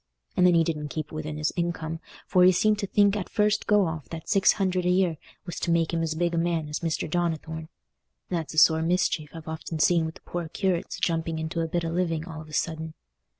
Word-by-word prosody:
And 180 - +5
then 175 - +5
he 165 - +5
didn't 150 -2 -2
keep 155 +2 -5
within 155 -1 -5
his 150 0 -1
income, 165 -2 -2 0.3
for 180 - +4
he 185 - +8
seemed 210 +3 +2
to 200 - -2
think 205 +1 +3
at 200 -3 -3
first 210 -1 +1
go 210 -2 +4
off 160 -7 -5
that 165 -1 -7
six 195 - +4
hundred 185 -3 0
a 180 - +1
year 180 -3 +2 0.3
was 175 - -5
to - - -2
make 165 0 +2
him 165 - +1
as 160 -1 -1
big 170 +1 0
a 170 - +1
man 165 -2 0
as 150 - -3
Mr. 165 -2 -2
Donnithorne. 160 -1 -2 0.6
That's 165 -3 -3
a - - -8
sore 160 +1 +6
mischief 165 -3 0
I've 165 -1 -10
often 160 0 -5
seen 165 +1 +3
with 160 - -8
the - - -15
poor 175 -2 -4
curates 180 0 -1
jumping 165 -1 -1
into 160 +1 -2
a 165 - -1
bit 170 +1 -1
of 165 - -2
a - - -4
living 165 -3 -1
all 160 -3 -7
of 155 - -12
a - - -13
sudden. 160 0 -2
165 Hz, 245 wpm, -26 LUFS, 160-180 Hz, 0.6 s, he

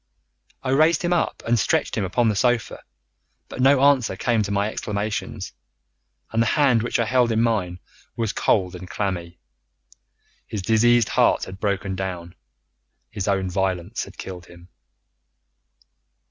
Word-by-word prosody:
I 130 - -3
raised 155 +5 +3
him 175 0 +1
up 175 - -1
and 120 0 +2
stretched - - 0
him 105 - -1
upon 115 +6 +1
the 105 - +1
sofa, 120 +1 0 0.7
but - - -5
no 135 +1 +5
answer 135 -8 +3
came 115 +3 +1
to 100 -1 -3
my 100 +1 +1
exclamations, 105 0 -4 0.8
and 115 - +1
the 115 - +2
hand 135 -6 +4
which 120 - -1
I 115 - +2
held 125 0 +2
in 110 - +1
mine 100 -7 0 0.4
was 115 -3 -2
cold 90 -3 +1
and 90 0 -9
clammy. 90 -4 -3 1.1
His 100 -3 -5
diseased 115 +2 +3
heart - - +3
had 95 +1 -8
broken 100 -2 -1
down. 90 -2 -5 0.8
His 105 -2 -4
own 95 -2 +1
violence 95 +2 -2
had 100 - -15
killed 90 -2 -8
him. 85 +1 -16
105 Hz, 150 wpm, -23 LUFS, 95-120 Hz, 1.1 s, no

